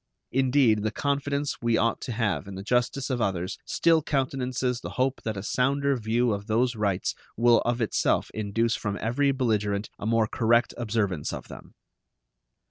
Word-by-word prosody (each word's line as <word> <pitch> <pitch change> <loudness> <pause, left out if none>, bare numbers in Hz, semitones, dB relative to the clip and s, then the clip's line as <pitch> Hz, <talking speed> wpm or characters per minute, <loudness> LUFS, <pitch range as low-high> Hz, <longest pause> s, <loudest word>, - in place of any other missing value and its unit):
Indeed, 130 -4 +3
the 110 - 0
confidence 140 +4 -2
we 115 -1 +2
ought 115 0 +1
to - - -5
have 105 - -1
in 100 - -7
the 95 - -6
justice 125 +4 0
of 125 -2 -1
others 95 -4 -2
still 165 -1 +3
countenances 130 -3 -1
the - - -6
hope 130 +1 0
that 110 -2 -3
a 100 - -5
sounder 140 +4 +1
view 115 0 +1
of 100 0 -5
those 120 +2 +1
rights 100 -4 0 0.2
will 120 +1 +5
of 120 0 0
itself 110 - +1
induce 110 +2 0
from 100 -2 -3
every 140 +5 +1
belligerent 105 -6 -1
a 105 - -4
more 115 -1 +3
correct 115 +1 +2
observance 105 -9 -1
of - - -7
them. - - -12
115 Hz, 170 wpm, -26 LUFS, 105-130 Hz, 0.2 s, will